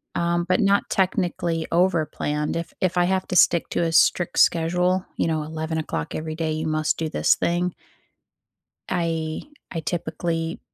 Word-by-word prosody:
um, 170 0 0
but 185 0 +2
not 200 -2 +2
technically 175 -4 0
overplanned, 155 -4 0
if 170 0 -4
if 185 -1 0
I 175 - +4
have 190 +1 0
to 180 - -2
stick 170 -1 +4
to - - 0
a 165 - 0
strict 175 +2 +3
schedule, 180 +2 +3
you - - +1
know, 160 -2 0
11:00 160 - -4
every 155 0 -4
day, 160 -1 -2
you 155 +1 -2
must 155 0 0
do 160 -1 -2
this - - +3
thing 175 +1 0 1.2
I 165 -3 -1 0.3
I 165 - -3
typically 165 0 -3
165 Hz, 155 wpm, -23 LUFS, 160-180 Hz, 1.2 s, I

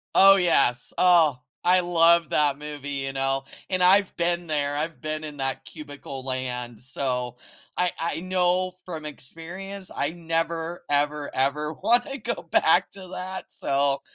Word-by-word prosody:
Oh, 195 +1 +8
yes. 140 -10 +2
Oh, 165 -7 +4 0.2
I 185 +1 +5
love 170 -1 +3
that 145 -2 +3
movie, 145 -1 -6
you 135 -1 -2
know? 135 0 0 0.3
And 185 -1 +1
I've 190 +2 +4
been 175 0 -1
there; 145 -2 +1
I've 155 +2 -2
been 155 0 -3
in 150 -2 -7
that 135 0 -1
cubicle 145 -3 -9
land, 125 -3 -3
so 125 -1 -2 0.4
I 180 -1 +2
I 165 0 -2
know 185 0 0
from 160 -4 -7
experience. 175 +7 -5
I 145 - 0
never, 165 0 -3
ever, 145 0 +1
ever 150 +4 +1
wanna 240 - +1
go - - -4
back - - +2
to 190 -2 -11
that, 185 0 -6
so 140 0 0
155 Hz, 150 wpm, -25 LUFS, 140-180 Hz, 0.4 s, Oh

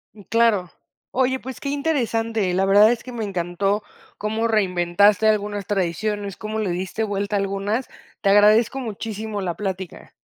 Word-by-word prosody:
Mm, 205 - -14
claro, 215 -6 +2 0.4
oye, 260 0 +1
pues 260 -1 -8
qué 280 - -4
interesante, 230 - 0
la 190 +2 +2
verdad 205 +3 +6
es 240 - -3
que 255 - -9
me 230 -2 -3
encantó 195 +1 -1 0.4
como 220 +2 -1
reinventaste 200 0 +3
algunas 205 -2 0
tradiciones, 200 +1 -2
cómo 215 0 -4
le 205 -4 -1
diste 185 +5 -3
vuelta 205 0 -2
a - - +1
algunas. 200 +5 -2 0.3
Te 200 - +2
agradezco 215 +5 +5
muchísimo 220 -2 -5
la 175 -3 -2
plática. 190 -3 -6
210 Hz, 160 wpm, -22 LUFS, 195-225 Hz, 0.4 s, verdad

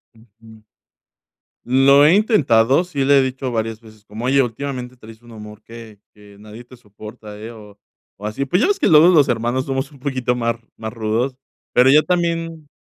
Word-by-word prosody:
Ujú. 110 0 -20 1.0
Lo 135 +3 +4
he 155 - +5
intentado, 145 - +2
sí 145 -7 -3
le 140 0 +4
he - - +4
dicho 130 0 -4
varias 110 -1 -3
veces, 110 -2 -19
como: 110 +3 -8
"Oye, 135 +2 +3
últimamente 125 +1 -6
traes 110 -1 -15
un 120 -1 -17
humor 105 -1 -12
que 115 -2 -13 0.2
que 105 -1 -18
nadie 110 +3 -13
te 125 - -16
soporta, 105 -1 -13
eh", 110 +2 -9
o 105 -3 -15 0.4
o 105 - -10
así, 110 +6 -4
pues 180 +9 0
ya - - +2
ves 400 -1 0
que - - +1
luego 155 +1 +6
los 160 -6 +4
hermanos 120 +3 -1
somos 135 0 -3
un 140 - -18
poquito 130 -3 -2
más, 115 -1 -2 0.2
más 110 0 -7
rudos, 115 +4 -2 0.4
pero 125 +2 +4
ya 150 +3 +6
también. 165 -3 -3
125 Hz, 190 wpm, -19 LUFS, 110-140 Hz, 1.0 s, luego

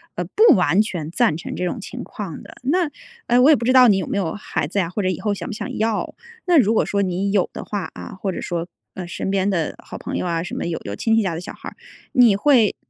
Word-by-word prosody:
呃， - - -2
不 435 -4 +5
完 185 +1 +3
全 175 -8 -4
赞 225 -6 +2
成 - - -6
这 - - -3
种 180 +6 -2
情 250 +4 -7
况 195 -8 -7
的。 - - -13
那， 330 +5 +1 0.4
呃， 240 +1 +4
我 270 - +6
也 310 - +8
不 240 - -4
知 245 - +3
道 255 -1 +7
你 205 -4 +5
有 190 - -2
没 - - -3
有 170 -5 -1
孩 160 -7 -3
子 200 - -1
呀 175 -3 0
或 195 +4 -3
者 185 - 0
以 185 - -2
后 210 -2 0
想 200 - -6
不 - - -5
想 210 - -5
要， 220 -1 -1 0.3
那 355 -2 +4
如 220 -3 +3
果 - - +2
说 200 - 0
你 190 +1 -1
有 195 -3 +2
的 - - -6
话 205 -2 -4
啊， - - -8
或 195 -2 -1
者 - - -5
说， 170 -1 -3 0.3
呃， 180 -2 -6
身 190 +1 -3
边 195 0 +1
的 170 -6 -1
好 - - -9
朋 - - -5
友 - - -2
啊 165 -1 -1
什 175 - -6
么 - - -3
有 170 -1 -2
有 100 - -5
亲 225 - +1
戚 225 - +4
家 185 -4 -1
的 165 - -4
小 175 - -8
孩 - - -8
儿， - - -19 0.4
你 240 -5 +5
会， 230 -2 +4
200 Hz, 305 characters per minute, -21 LUFS, 180-230 Hz, 0.4 s, 也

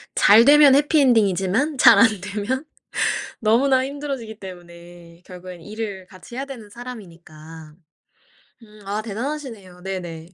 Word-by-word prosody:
잘 220 +4 +6
되면 290 -1 +7
해피 295 +2 +3
엔딩이지만 225 - +1
잘 - - +7
안 230 - +7
되면 210 +8 -4 0.8
너무나 260 +4 +2
힘들어지기 270 -6 -6
때문에 175 -2 -13
결국에는 180 -2 -11
일을 210 -3 -7
같이 185 +5 -14
해야 270 - -3
되는 240 -7 -11
사람이니까. 165 -9 -12 0.9
음 210 -1 -18
아 205 +2 -3
대단하시네요. 225 -5 -7
네네. 175 -3 -7
210 Hz, 300 characters per minute, -21 LUFS, 180-260 Hz, 0.9 s, 되면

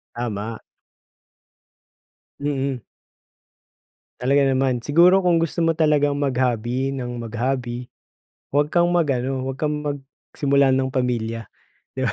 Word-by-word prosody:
Tama. 115 -1 -4 1.8
Mm. 135 -3 -2 1.4
Talaga 135 +3 +3
naman. 130 -2 +1
Siguro 170 +9 +5
kung 175 -3 +3
gusto 165 +1 -3
mo 165 -1 +2
talagang 150 -2 +2
mag-hobby 130 -1 0
nang 120 -2 -5
mag-hobby 120 +1 -3 0.6
huwag 145 +1 +2
kang 175 0 +3
mag-ano, 135 -6 0
huwag 135 0 -5
kang 150 -1 -1
magsimula 140 -1 0
ng 130 0 +1
pamilya, 115 -3 -1 0.5
'di 130 - -3
ba? 115 - +1
135 Hz, 110 wpm, -22 LUFS, 125-145 Hz, 1.8 s, Siguro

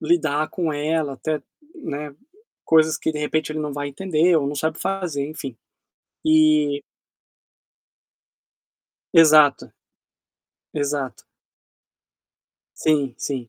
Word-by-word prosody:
lidar 155 -2 +1
com 165 -4 -2
ela, 150 0 -1
até, 155 +3 -3 0.4
né, 150 - -6 0.5
coisas 160 -1 +3
que 160 - -1
de 150 - -5
repente 155 0 -1
ele 155 - -4
não 150 -1 -3
vai 145 0 -4
entender 170 +2 +2
ou 145 -3 +1
não 145 +1 -3
sabe 160 +3 -2
fazer, 180 -8 -2
enfim. 140 -5 -7 0.7
E 155 -2 +3 2.3
Exato. 155 -3 +6 1.0
Exato. 145 -3 -3 1.6
Sim, 145 -5 +1
sim. 130 -5 -4
155 Hz, 100 wpm, -22 LUFS, 145-160 Hz, 2.3 s, Exato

